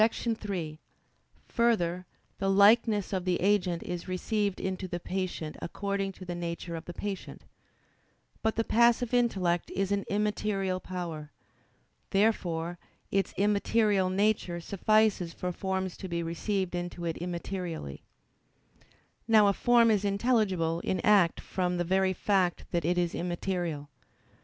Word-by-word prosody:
3: 205 Hz, -8 st, -1 dB, 0.7 s
Further, 185 Hz, -7 st, +1 dB, 0.3 s
the 195 Hz, -, 0 dB
likeness 205 Hz, +1 st, +4 dB
of 185 Hz, -2 st, -1 dB
the 180 Hz, -1 st, 0 dB
agent 185 Hz, -3 st, +1 dB
is 175 Hz, 0 st, -5 dB
received 200 Hz, +2 st, -1 dB
into 190 Hz, 0 st, -3 dB
the 175 Hz, -1 st, -4 dB
patient 180 Hz, -4 st, -4 dB
according 200 Hz, +2 st, -2 dB
to 185 Hz, -, -11 dB
the 175 Hz, -, -4 dB
nature 170 Hz, 0 st, -4 dB
of 165 Hz, 0 st, -7 dB
the -, -, -6 dB
patient. 200 Hz, -2 st, -5 dB, 1.0 s
But 220 Hz, 0 st, 0 dB
the 225 Hz, -, +1 dB
passive 235 Hz, +1 st, +3 dB
intellect 190 Hz, -8 st, +1 dB
is 195 Hz, +1 st, -1 dB
an 200 Hz, -1 st, 0 dB
immaterial 205 Hz, -2 st, 0 dB
power. 170 Hz, -5 st, -6 dB, 0.8 s
Therefore 175 Hz, -5 st, 0 dB, 0.3 s
its 195 Hz, 0 st, +1 dB
immaterial 205 Hz, -1 st, +2 dB
nature 195 Hz, -2 st, +1 dB
suffices 200 Hz, -1 st, +2 dB
for 180 Hz, -, -3 dB
forms 190 Hz, 0 st, -2 dB
to 190 Hz, -, -6 dB
be 170 Hz, -1 st, -2 dB
received 185 Hz, +3 st, -2 dB
into 175 Hz, 0 st, -4 dB
it 165 Hz, -1 st, -2 dB
immaterially. 175 Hz, -, -5 dB, 1.3 s
Now 220 Hz, -2 st, +6 dB
a -, -, +2 dB
form 235 Hz, +1 st, +4 dB
is 210 Hz, -2 st, +2 dB
intelligible 200 Hz, -6 st, +1 dB
in 185 Hz, +1 st, -1 dB
act 200 Hz, -5 st, +4 dB
from 180 Hz, -1 st, -2 dB
the 175 Hz, -, +1 dB
very 190 Hz, +2 st, +2 dB
fact 185 Hz, -2 st, +1 dB
that 170 Hz, -3 st, 0 dB
it 175 Hz, +1 st, +1 dB
is 175 Hz, -1 st, +1 dB
immaterial. 175 Hz, -4 st, -3 dB
190 Hz, 135 wpm, -29 LUFS, 175-205 Hz, 1.3 s, Now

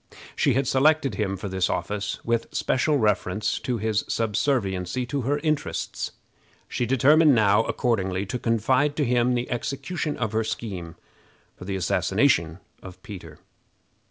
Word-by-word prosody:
She -, -, +2 dB
had 135 Hz, -1 st, +1 dB
selected 140 Hz, -1 st, +3 dB
him 95 Hz, 0 st, -2 dB
for 100 Hz, -, -5 dB
this 95 Hz, -1 st, 0 dB
office 100 Hz, -1 st, -3 dB
with 115 Hz, -1 st, 0 dB
special 145 Hz, +3 st, +1 dB
reference 105 Hz, -2 st, 0 dB
to 125 Hz, -2 st, -2 dB
his 110 Hz, -1 st, 0 dB
subserviency 105 Hz, -2 st, 0 dB
to 140 Hz, +3 st, -2 dB
her 140 Hz, +4 st, 0 dB
interests. 150 Hz, -, -2 dB, 0.5 s
She 120 Hz, -, -2 dB
determined 145 Hz, +4 st, +5 dB
now, 105 Hz, -1 st, +4 dB
accordingly, 95 Hz, -6 st, -1 dB
to 125 Hz, +6 st, -4 dB
confide 130 Hz, +6 st, +1 dB
to 145 Hz, -, +1 dB
him 125 Hz, 0 st, +2 dB
the 120 Hz, 0 st, -3 dB
execution 145 Hz, +6 st, -3 dB
of 110 Hz, -4 st, -2 dB
her 110 Hz, 0 st, 0 dB
scheme 95 Hz, -7 st, -5 dB, 0.6 s
for -, -, -11 dB
the 95 Hz, 0 st, -3 dB
assassination 85 Hz, -2 st, +1 dB, 0.2 s
of 95 Hz, 0 st, -11 dB
Peter. 85 Hz, -8 st, -10 dB
115 Hz, 145 wpm, -25 LUFS, 95-130 Hz, 0.6 s, determined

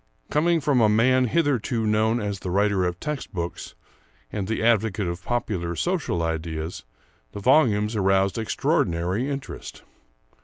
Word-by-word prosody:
Coming 165 Hz, +2 st, +3 dB
from 135 Hz, -3 st, +2 dB
a 110 Hz, -, +5 dB
man 130 Hz, +4 st, +4 dB
hitherto 125 Hz, -5 st, 0 dB
known 110 Hz, +2 st, +2 dB
as 100 Hz, -3 st, -3 dB
the 90 Hz, -, -5 dB
writer 100 Hz, 0 st, +2 dB
of 90 Hz, 0 st, -2 dB
text 150 Hz, -2 st, -4 dB
books 85 Hz, -1 st, -5 dB, 0.6 s
and 100 Hz, -3 st, -3 dB
the 110 Hz, +1 st, -2 dB
advocate 110 Hz, -3 st, +2 dB
of 85 Hz, +1 st, -4 dB
popular 95 Hz, -8 st, -2 dB
social 160 Hz, -, -1 dB
ideas, 80 Hz, 0 st, -4 dB, 0.5 s
the -, -, -6 dB
volumes 110 Hz, -4 st, +3 dB
aroused 95 Hz, +1 st, +2 dB
extraordinary 95 Hz, +1 st, 0 dB
interest. 140 Hz, -1 st, -7 dB
105 Hz, 140 wpm, -24 LUFS, 90-125 Hz, 0.6 s, a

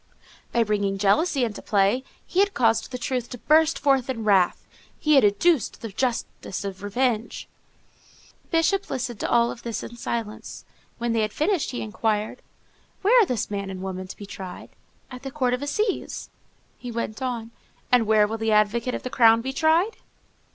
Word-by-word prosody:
By 235 Hz, -, +3 dB
bringing 205 Hz, -2 st, 0 dB
jealousy 230 Hz, -, +2 dB
into 225 Hz, -3 st, -3 dB
play, 205 Hz, +5 st, +2 dB, 0.2 s
he 365 Hz, -, -1 dB
had 400 Hz, 0 st, +3 dB
caused 225 Hz, -2 st, +2 dB
the 255 Hz, -, -5 dB
truth 250 Hz, -1 st, -3 dB
to 245 Hz, -, -7 dB
burst 315 Hz, +5 st, +3 dB
forth 270 Hz, -3 st, +2 dB
in 230 Hz, -4 st, -3 dB
wrath, 195 Hz, -4 st, +3 dB, 0.3 s
he 305 Hz, -, +2 dB
had 275 Hz, -, +6 dB
educed 230 Hz, -, +2 dB
the 225 Hz, -, -4 dB
justice 230 Hz, -3 st, -3 dB
of 195 Hz, -1 st, -6 dB
revenge. 225 Hz, +2 st, -1 dB, 0.9 s
The -, -, -34 dB
Bishop 355 Hz, +4 st, +1 dB
listened 240 Hz, -4 st, -3 dB
to -, -, -2 dB
all 235 Hz, 0 st, +3 dB
this 230 Hz, -1 st, -5 dB
in 235 Hz, -, -9 dB
silence. 225 Hz, -2 st, -5 dB, 0.3 s
When 235 Hz, 0 st, -1 dB
they 225 Hz, -, +2 dB
had 215 Hz, 0 st, -1 dB
finished, 330 Hz, -, 0 dB
he 245 Hz, -, -4 dB
inquired,— 215 Hz, 0 st, -2 dB, 0.6 s
"Where 430 Hz, +6 st, +5 dB
are 415 Hz, -, +3 dB
this 240 Hz, -4 st, -2 dB
man 200 Hz, -1 st, -3 dB
and 190 Hz, -1 st, -6 dB
woman 185 Hz, -1 st, -5 dB
to -, -, -9 dB
be 205 Hz, -, -8 dB
tried?" 190 Hz, -2 st, -9 dB, 0.4 s
"At 250 Hz, 0 st, -8 dB
the 270 Hz, -, -5 dB
Court 260 Hz, -3 st, 0 dB
of 250 Hz, -, -1 dB
Assizes." 395 Hz, +9 st, -2 dB, 0.5 s
He 245 Hz, -, -7 dB
went 230 Hz, 0 st, -4 dB
on, 235 Hz, -3 st, -3 dB, 0.4 s
"And 245 Hz, -3 st, +4 dB
where 215 Hz, -1 st, +5 dB
will 220 Hz, +2 st, -4 dB
the 225 Hz, 0 st, 0 dB
advocate 215 Hz, +4 st, +2 dB
of -, -, -6 dB
the 255 Hz, -, -5 dB
crown 230 Hz, -1 st, +5 dB
be 265 Hz, +3 st, -4 dB
tried?" 325 Hz, +9 st, +2 dB
235 Hz, 185 wpm, -24 LUFS, 210-265 Hz, 0.9 s, had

